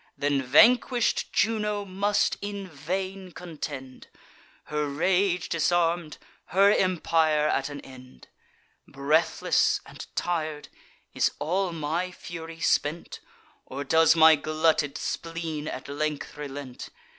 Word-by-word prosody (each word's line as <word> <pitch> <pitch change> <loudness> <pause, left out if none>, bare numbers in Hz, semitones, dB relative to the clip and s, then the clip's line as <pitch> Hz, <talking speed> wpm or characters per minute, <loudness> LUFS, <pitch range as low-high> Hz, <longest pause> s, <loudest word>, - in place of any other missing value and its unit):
Then 140 -1 +1
vanquish'd 235 - +4
Juno 210 -2 0
must 200 +2 +1
in 200 -1 -5
vain 185 +4 -5
contend, 145 -6 -8 0.6
Her 150 0 -2
rage 180 +5 +1
disarm'd, 170 -1 0 0.3
her 195 +3 +4
empire 160 -5 +2
at 135 -2 0
an 145 -1 -7
end. 130 - -14 0.6
Breathless 140 +4 +1
and - - -10
tir'd, 155 -4 -2 0.4
is - - +2
all 185 +3 -1
my 165 +3 -2
fury 165 -2 -9
spent? 155 +4 0 0.5
Or 140 +2 -5
does 160 +3 +4
my 160 -1 +8
glutted 155 -1 0
spleen 165 -2 -4
at - - -6
length 150 +1 -3
relent? 140 -3 -7
160 Hz, 110 wpm, -26 LUFS, 145-185 Hz, 0.6 s, my